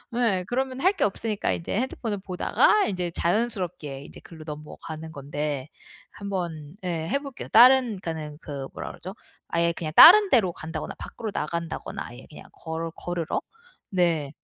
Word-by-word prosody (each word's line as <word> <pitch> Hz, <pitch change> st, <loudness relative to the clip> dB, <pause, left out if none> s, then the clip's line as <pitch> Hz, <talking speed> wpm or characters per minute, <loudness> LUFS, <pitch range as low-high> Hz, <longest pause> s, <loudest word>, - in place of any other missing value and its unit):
예. 200 Hz, -7 st, +1 dB
그러면 260 Hz, +1 st, -2 dB
할 375 Hz, +7 st, +4 dB
게 -, -, +3 dB
없으니까 210 Hz, +1 st, -1 dB
이제 170 Hz, -, -4 dB
핸드폰을 230 Hz, -4 st, -3 dB
보다가 195 Hz, -, +2 dB
인제 180 Hz, -3 st, -2 dB
자연스럽게 175 Hz, -, -2 dB
이제 -, -, -12 dB
글로 160 Hz, -2 st, -12 dB
넘어가는 155 Hz, +1 st, -8 dB
건데 145 Hz, -1 st, -4 dB, 0.4 s
한번 175 Hz, -7 st, -5 dB
예, 165 Hz, -3 st, -2 dB
해볼게요. 280 Hz, -2 st, -3 dB
다른 245 Hz, -3 st, +6 dB
그러니까는 155 Hz, -3 st, -5 dB
그 140 Hz, -2 st, -6 dB
뭐라 -, -, -6 dB
그러죠? -, -, -9 dB, 0.4 s
아예 170 Hz, 0 st, +2 dB
그냥 160 Hz, -2 st, -4 dB
다른 405 Hz, +4 st, +10 dB
데로 220 Hz, -, +4 dB
간다거나 160 Hz, 0 st, -6 dB
밖으로 220 Hz, -2 st, -6 dB
나간다거나 170 Hz, +2 st, -4 dB
아예 120 Hz, +2 st, -12 dB
그냥 150 Hz, -, -12 dB
걸어 165 Hz, 0 st, -5 dB
걸으러. 175 Hz, -2 st, -3 dB, 0.5 s
네. 170 Hz, -6 st, +1 dB
175 Hz, 355 characters per minute, -25 LUFS, 155-220 Hz, 0.5 s, 다른